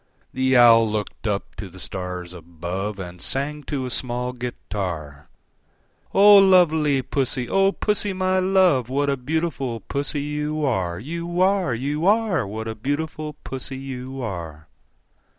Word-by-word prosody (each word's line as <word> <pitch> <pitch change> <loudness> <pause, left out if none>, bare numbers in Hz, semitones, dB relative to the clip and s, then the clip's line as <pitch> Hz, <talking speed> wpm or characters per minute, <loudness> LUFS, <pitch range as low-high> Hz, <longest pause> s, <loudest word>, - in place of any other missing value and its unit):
The 130 0 +2
Owl 115 -2 +7
looked 105 +1 -4
up 100 -1 -2
to 100 - -6
the 95 +2 -13
stars 90 -1 -5
above, 85 +4 -5
And 90 -2 -8
sang 150 +2 -1
to 135 -3 -3
a 125 - -4
small 125 0 -1
guitar, 90 - -5 0.8
"O 205 +1 +8
lovely 160 -8 +4
Pussy, 130 -1 -1
O 195 +5 +3
Pussy, 210 0 -1
my 185 0 +1
love, 185 -10 +3
What 140 +2 +1
a - - +1
beautiful 135 -3 -2
Pussy 145 +1 -2
you 150 +1 -2
are, 95 -10 -1
You 170 - -4
are, 190 -9 +2
You 145 +7 -1
are! 210 - +2
What 110 +2 -5
a 110 - -3
beautiful 150 +6 -3
Pussy 135 0 -5
you 130 0 -6
are!" 80 -7 -6
130 Hz, 145 wpm, -23 LUFS, 105-155 Hz, 0.8 s, O